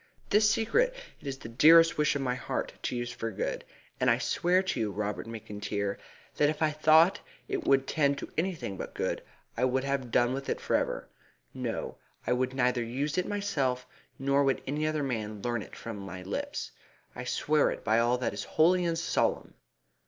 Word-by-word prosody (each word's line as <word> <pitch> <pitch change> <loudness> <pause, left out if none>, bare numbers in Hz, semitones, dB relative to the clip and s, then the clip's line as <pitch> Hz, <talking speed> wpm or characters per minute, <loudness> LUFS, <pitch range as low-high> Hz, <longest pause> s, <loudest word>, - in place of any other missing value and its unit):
This 210 +1 +5
secret 475 - +2 0.2
it - - -11
is 135 -1 -3
the 135 - -9
dearest 165 +8 +6
wish 150 0 +2
of 140 - -1
my 125 -2 0
heart 125 - -3
to - - -2
use 120 0 -3
for 115 - -4
good, 105 - -3 0.4
and 130 - +3
I 115 - +4
swear 175 +9 +2
to 190 - -2
you, 110 - 0
Robert 105 +2 -3
McIntyre, 105 -2 -3 0.4
that 145 - +4
if 155 +1 -1
I 155 - +3
thought 155 +4 +5 0.3
it 395 -4 -3
would 135 -1 +4
tend 140 -1 +1
to - - -7
anything 160 - -2
but - - -7
good - - -1 0.3
I 120 - -1
would 130 +1 +1
have 140 -2 -1
done 120 +2 +3
with 135 +1 -4
it - - -1
for - - 0
ever. - - -1 0.5
No, - - -4 0.3
I - - +2
would 130 +1 -1
neither 125 -2 +2
use 140 +8 -1
it 180 - -1
myself 140 -12 -1 0.3
nor 140 +1 +2
would 135 -1 +1
any 150 +3 -1
other 155 -1 0
man 110 -5 -3
learn 120 -2 -1
it - - -10
from 115 -2 -7
my 95 -2 -7
lips. 95 - -4 0.4
I - - -5
swear 150 -1 +2
it - - -5
by 110 +1 +3
all 120 +1 +3
that 125 - -2
is - - -4
holy 180 +3 +3
and 165 -1 0
solemn!" 165 - 0
135 Hz, 200 wpm, -29 LUFS, 115-155 Hz, 0.5 s, dearest